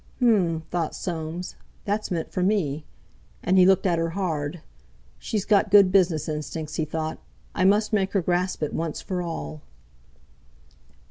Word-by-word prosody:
"H'm!" 195 -10 +2
thought 170 -3 -1
Soames, 170 0 -5 0.3
"that's 210 +1 -1
meant 170 -3 -3
for 185 - -2
me!" 165 -7 0 0.6
and 185 +2 +3
he 180 - +7
looked 190 0 +4
at 175 -3 +2
her 165 0 0
hard. 160 -4 -2 0.6
"She's 210 -3 -2
got 210 -1 +3
good 195 -2 +7
business 175 -5 +3
instincts," 155 0 -4
he 160 - 0
thought. 155 +1 -4 0.3
"I 185 - +1
must 210 +3 +3
make 195 -2 +1
her 195 - +2
grasp 180 -1 0
it 150 - -2
once 165 -2 -3
for 185 -2 -3
all!" 75 - -5
175 Hz, 155 wpm, -25 LUFS, 160-195 Hz, 0.6 s, he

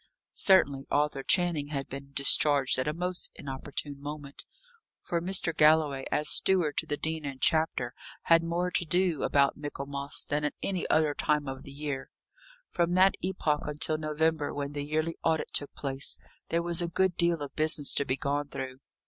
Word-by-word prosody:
Certainly, 140 -8 +3
Arthur 145 -1 0
Channing 170 -2 +2
had 140 -2 -4
been 140 +1 -8
discharged 140 -1 +3
at 130 - -1
a - - +1
most 180 +2 -2
inopportune 140 +1 -5
moment, 145 -1 -6 0.5
for 170 -1 -2
Mr. 175 -2 +1
Galloway, 150 -3 +3
as 150 - +1
steward 175 -5 +3
to - - -1
the 145 - -2
Dean 160 +1 -3
and 135 -2 -6
Chapter, 145 -6 +1 0.3
had 165 0 +5
more 170 +2 -2
to - - +1
do 175 -1 +1
about 140 -1 +2
Michaelmas, 140 -1 -1
than 150 +1 -1
at 150 - -1
any 185 -3 -2
other 155 -1 +3
time 150 0 0
of 135 0 -6
the 140 - -11
year. 140 -1 -5 0.6
From 175 0 0
that 190 +1 +5
epoch 160 -6 -1
until 155 +1 -1
November, 155 0 0
when 140 0 -3
the 145 -1 -4
yearly 155 +2 -1
audit 160 -1 0
took 145 - 0
place, 135 0 -3 0.3
there 170 0 0
was 170 0 +1
a 170 - 0
good 180 +1 +1
deal 170 -2 +2
of 140 - -9
business 155 -2 +2
to - - +1
be 130 -1 -2
gone 145 +1 -2
through. 130 -2 -6
150 Hz, 180 wpm, -29 LUFS, 140-165 Hz, 0.6 s, had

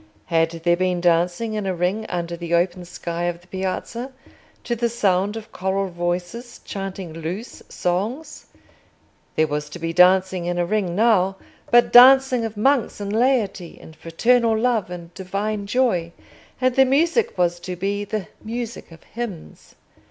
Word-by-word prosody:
Had 165 0 +3
there 175 0 +4
been 180 0 0
dancing 175 +5 +1
in 210 -2 -3
a 185 - -1
ring 185 +6 -1
under 170 -1 -3
the 170 0 -2
open 175 +1 0
sky 170 0 -4
of 175 -1 -2
the 175 - -23
Piazza, 190 +7 -4 0.5
to 240 - -2
the 235 0 0
sound 205 -2 +1
of 220 -1 -10
choral 190 +1 -1
voices 175 +8 -4
chanting 195 -3 -6
loose 170 +8 -6
songs? 220 - -3 0.9
There 155 - +3
was 150 0 -3
to 155 - -8
be 165 -1 -3
dancing 185 0 +4
in 175 0 -1
a 175 - +1
ring 185 -2 -1
now, 195 -3 +3 0.3
but 240 0 +4
dancing 260 0 +7
of 220 -1 -6
monks 265 +1 +1
and 200 0 -4
laity 225 -7 0
in 160 - -13
fraternal 225 +8 +2
love 225 -4 0
and 175 -1 -9
divine 200 +3 -3
joy, 200 -8 0 0.5
and 255 -1 +1
the 270 - +6
music 330 - +1
was 175 -1 +1
to 180 +1 -6
be 200 +3 -2
the 205 -2 -4 0.2
music 230 -3 -6
of 165 - -15
hymns. 210 - -8
190 Hz, 160 wpm, -22 LUFS, 175-230 Hz, 0.9 s, dancing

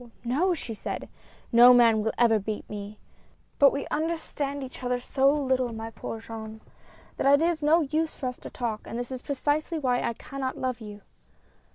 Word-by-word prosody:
no!" 285 +11 +1
she 240 -7 -6
said, 210 - -5 0.4
"no 245 +1 +8
man 230 -3 +5
will 220 +1 0
ever 225 -2 +4
beat 210 +1 -5
me. 205 0 -7 0.6
But 280 -1 +7
we 280 - -3
understand 300 -3 -2
each 260 -1 -9
other 250 0 -1
so 270 +2 +2
little, 260 -4 0
my 225 0 -6
poor 225 +1 -6
Jean, 220 -1 -8 0.6
that 275 - +3
it 325 - +2
is 340 -2 -1
no 310 +3 +4
use 315 +2 -1
for 270 - -6
us 250 -1 -3
to - - -9
talk, 225 -3 -3
and 230 - -6
this 245 +1 -5
is 255 -1 -5
precisely 295 +4 -1
why 255 -4 +1
I 235 - -1
cannot 265 +2 -5
love 255 -2 -3
you." 210 -1 -9
250 Hz, 190 wpm, -27 LUFS, 225-285 Hz, 0.6 s, no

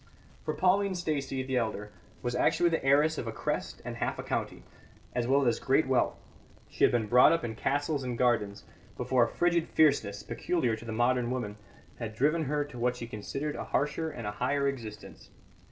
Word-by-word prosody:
For - - -2
Pauline 190 +1 +2
Stacey, 145 -6 -2
the 130 0 -1
elder, 105 -3 -2 0.3
was 120 0 -1
actually 175 +6 +3
the 165 - 0
heiress 145 +3 +3
of 120 - -4
a - - -2
crest - - -3
and - - -5
half - - -2
a - - -5
county, - - -3 0.5
as 120 -1 -1
well 135 +1 +3
as 115 -2 +2
great 135 +4 +2
wealth; 130 -1 +1 0.5
she - - -3
had - - +7
been 120 -3 +1
brought 125 +4 +6
up 165 -1 +1
in 115 - -3
castles 145 +4 -1
and 125 -2 -3
gardens, 105 -5 +1 0.3
before 130 -2 +2
a - - -5
frigid 170 -1 +1
fierceness 110 -10 +2
(peculiar 130 -11 -1
to 110 - -11
the 115 - -5
modern 120 +1 +1
woman) 120 -5 -3 0.4
had 110 -3 -5
driven 150 +6 +2
her 145 +1 0
to 130 -4 -10
what 125 +1 +1
she 120 - -6
considered 135 +7 -4
a - - -5
harsher 150 +2 -1
and 125 -7 -7
a 105 - -2
higher 140 +6 0
existence. 115 -6 -7
130 Hz, 200 wpm, -30 LUFS, 115-150 Hz, 0.5 s, had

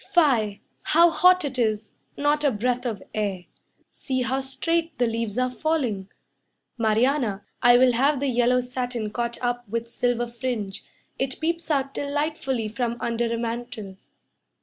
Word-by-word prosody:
Fie, 225 -10 +3 0.3
how 340 0 +7
hot 365 0 +5
it 270 -2 -3
is, 215 -2 0 0.2
not 295 +1 +1
a 290 - +5
breath 250 +2 -1
of 215 -5 -4
air! 200 -4 -2 0.5
See 260 -2 -2
how 260 +2 0
straight 330 +4 -1
the 245 - +3
leaves 230 -2 -2
are 255 0 +1
falling. 250 -10 -1 0.7
Marianna, 225 -2 +1 0.2
I 245 0 +7
will 255 0 +5
have 275 +4 +2
the 280 - -1
yellow 250 0 +3
satin 245 -3 -3
caught 235 +1 -2
up 245 -2 -2
with 230 +1 -3
silver 240 0 0
fringe, 235 -5 -4 0.4
It 265 -1 -2
peeps 335 +1 -2
out 275 -2 0
delightfully 285 -5 -1
from 235 +2 -2
under 235 0 -1
a 230 - 0
mantle. 230 -4 -5
245 Hz, 150 wpm, -25 LUFS, 230-275 Hz, 0.7 s, how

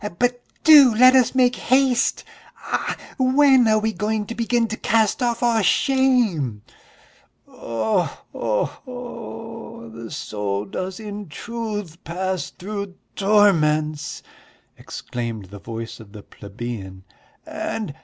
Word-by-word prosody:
"But 245 0 +1 0.2
do 285 -7 +8
let 255 +3 +7
us 255 -1 +4
make 250 -1 +4
haste! 260 -1 +2 0.3
Ah, - - -3 0.2
when 260 -1 +5
are 215 0 +4
we 220 +1 0
going 210 0 -1
to 230 - -6
begin 235 0 +1
to 225 - -2
cast 225 +2 +1
off 240 -1 0
all 230 -2 +3
shame!" 215 - +2 0.8
"Oh 110 -1 -1 0.3
ho 110 -3 0
ho!... 230 - -9
The 115 0 -8
soul 100 -1 -3
does 185 - -5
in 205 -3 -7
truth 210 -3 -6
pass 185 -1 -3
through 200 0 -6 0.2
torments!" 155 -7 +2 0.5
exclaimed 115 -5 -6
the 100 - -9
voice 115 +1 -7
of 105 -3 -14
the 105 -2 -10
plebeian, 100 -3 -8 0.4
"and 315 - -4
210 Hz, 120 wpm, -22 LUFS, -, 0.8 s, do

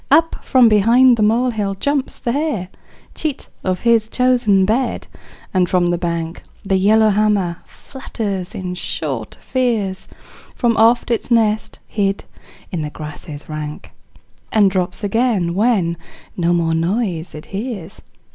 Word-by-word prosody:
Up 325 +3 +3
from 255 -3 +5
behind 235 +4 +5
the 225 - -2
molehill 220 -2 +1
jumps 280 +6 -1
the 240 - -2
hare, 275 - -2 0.4
Cheat 300 -3 -4
of 185 -1 -1
his 230 -2 +3
chosen 240 -6 +3
bed, 235 +6 0 0.5
and 180 -2 +2
from 175 -1 +2
the 175 - 0
bank 170 -1 -3 0.2
The 195 -1 +1
yellowhammer 210 -3 +3
flutters 200 -8 -6
in 180 -1 -4
short 140 -9 -4
fears 225 -7 -1 0.5
From 235 -3 +1
off 230 +2 +4
its 235 - -1
nest 220 -2 +1
hid 200 -2 -1 0.5
in 175 - -2
the 150 - -3
grasses 150 0 -8
rank, 155 -1 -6 0.6
And 205 -3 +4
drops 185 +2 -2
again 205 -5 +1
when 190 -5 +1 0.4
no 175 -1 +1
more 165 -2 +1
noise 175 0 -1
it 150 - -9
hears. 205 -4 -5
205 Hz, 135 wpm, -19 LUFS, 175-235 Hz, 0.6 s, from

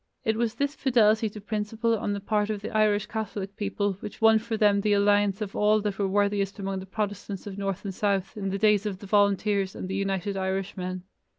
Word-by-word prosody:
It 220 - +1
was 230 0 -1
this 280 +3 -1
fidelity 225 -6 +3
to 210 - -9
principle 220 +2 -1
on 205 -1 -2
the 200 - -3
part 210 +1 0
of 205 -1 -3
the - - -4
Irish 210 -1 +3
Catholic 205 -3 -5
people 205 -1 -1
which 205 - -8
won 225 0 +6
for 225 0 -3
them 205 -1 +4
the 210 0 +2
alliance 205 0 +3
of 205 -2 -4
all 210 +1 +4
that 205 -1 -3
were 200 - +2
worthiest 200 0 0
among 195 -1 -3
the 190 - -9
Protestants 205 -1 -4
of 200 -2 -6
north 195 0 -3
and 195 - -3
south 195 -1 -1
in 195 -2 -3
the 195 - -2
days 210 0 +3
of 195 -3 -4
the 200 - -11
Volunteers 200 -1 +2
and - - -5
the 190 - -4
United 195 0 -1
Irishmen. 190 -1 -3
205 Hz, 220 wpm, -27 LUFS, 195-215 Hz, -, won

